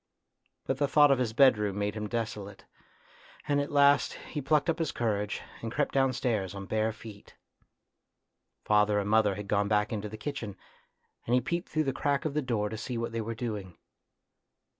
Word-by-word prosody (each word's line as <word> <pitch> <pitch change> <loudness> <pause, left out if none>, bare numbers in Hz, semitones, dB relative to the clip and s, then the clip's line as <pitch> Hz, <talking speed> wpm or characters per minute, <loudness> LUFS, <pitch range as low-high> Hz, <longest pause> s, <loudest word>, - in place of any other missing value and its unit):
But 135 - -1
the 145 - +2
thought 145 +1 +6
of 135 - +3
his 120 -3 0
bedroom 105 -6 +4
made 105 0 -1
him 105 -1 -4
desolate, 105 -4 -4 0.8
and 145 -1 +2
at 145 - -4
last 145 0 +4 0.2
he 150 - -3
plucked 150 +3 +2
up 165 -1 0
his 160 -3 0
courage, 105 -3 -2 0.2
and 115 - -4
crept 120 - -1
downstairs 120 -8 0
on 100 0 -6
bare 110 +2 0
feet. 110 -2 -12 1.3
Father 105 0 +3
and 100 -1 0
mother 105 -2 +3
had 105 0 -7
gone 100 0 +1
back 105 +1 +1
into 105 -1 -3
the 110 - -8
kitchen, 115 -5 -5 0.7
and 120 - +3
he - - +5
peeped 170 +8 -3
through 155 - +1
the 135 -2 -1
crack 140 +3 0
of 155 - -1
the 150 - 0
door 115 -6 -1
to 110 - -5
see 120 +2 -4
what 115 0 -3
they 115 0 -2
were 115 +1 -4
doing. 105 -7 -5
115 Hz, 190 wpm, -29 LUFS, 105-135 Hz, 1.3 s, thought